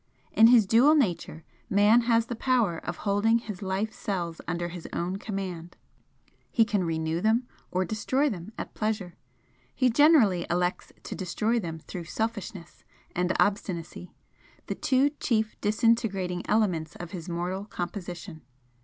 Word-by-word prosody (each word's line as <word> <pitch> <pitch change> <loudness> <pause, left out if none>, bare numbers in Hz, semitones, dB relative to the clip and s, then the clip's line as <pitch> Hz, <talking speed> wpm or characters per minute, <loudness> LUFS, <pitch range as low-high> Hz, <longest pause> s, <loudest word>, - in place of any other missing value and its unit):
In 220 +3 +7
his 235 -3 +6
dual 245 +10 +5
nature 175 - 0 0.3
Man 205 +4 +5
has 230 -1 +4
the 240 - -5
power 230 -9 +1
of 175 - -5
holding 205 +3 +3
his 210 -5 -7
life 195 +3 -2
cells 175 -6 -4
under 175 0 -2
his 175 -1 -8
own 180 +3 -2
command 185 -5 -6 0.7
he 225 - +3
can 205 -4 0
renew 160 0 -1
them 230 +4 +2 0.2
or 185 +1 0
destroy 255 +8 0
them 200 - -5
at - - -6
pleasure. 210 -5 -2 0.6
He 255 -1 +3
generally 235 - +5
elects 180 +1 -1
to - - -6
destroy 215 +6 -1
them 165 -5 -5
through 170 +2 -8
selfishness 205 -3 -5 0.3
and 180 +1 +1
obstinacy, 180 -4 -1 0.5
the - - -3
two 270 +2 +2
chief 220 -2 0
disintegrating 205 -4 +1
elements 180 -7 +1
of 175 -1 -8
his 180 -2 -7
mortal 180 +3 -3
composition. 175 -3 -6
195 Hz, 145 wpm, -27 LUFS, 175-225 Hz, 0.7 s, In